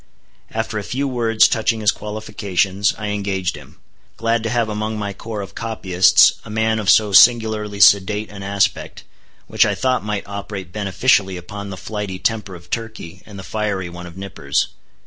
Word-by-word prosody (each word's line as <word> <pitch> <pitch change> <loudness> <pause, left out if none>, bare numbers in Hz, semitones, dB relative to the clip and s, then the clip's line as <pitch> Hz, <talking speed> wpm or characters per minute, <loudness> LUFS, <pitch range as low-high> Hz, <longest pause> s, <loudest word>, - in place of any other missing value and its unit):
After 110 -1 -3
a - - -6
few 135 +6 -2
words 115 -4 +3
touching 115 0 0
his 105 - +4
qualifications, 100 -2 -1
I 105 -1 -4
engaged 100 -3 -2
him, - - -14 0.4
glad 115 0 0
to 115 - -3
have 120 -1 +1
among 110 +1 -3
my 100 -1 -4
corps 110 +1 -6
of 95 - -11
copyists 95 -6 +4
a - - -12
man 110 +1 0
of 105 -2 -1
so 105 -2 +5
singularly 110 -2 +4
sedate 105 +2 +4
an 100 -1 -9
aspect, 100 0 -1 0.4
which - - +3
I - - 0
thought 130 -3 0
might 105 -1 -3
operate 100 -3 -7
beneficially 100 -1 +1
upon 100 +3 -8
the 95 - -7
flighty 105 -2 -5
temper 105 -2 -2
of 85 - -15
Turkey, 110 -6 -6
and 105 -2 -11
the 95 - -8
fiery 100 -4 -3
one 90 0 -9
of 85 +1 -12
Nippers. 70 -8 -2
105 Hz, 175 wpm, -20 LUFS, 95-110 Hz, 0.4 s, so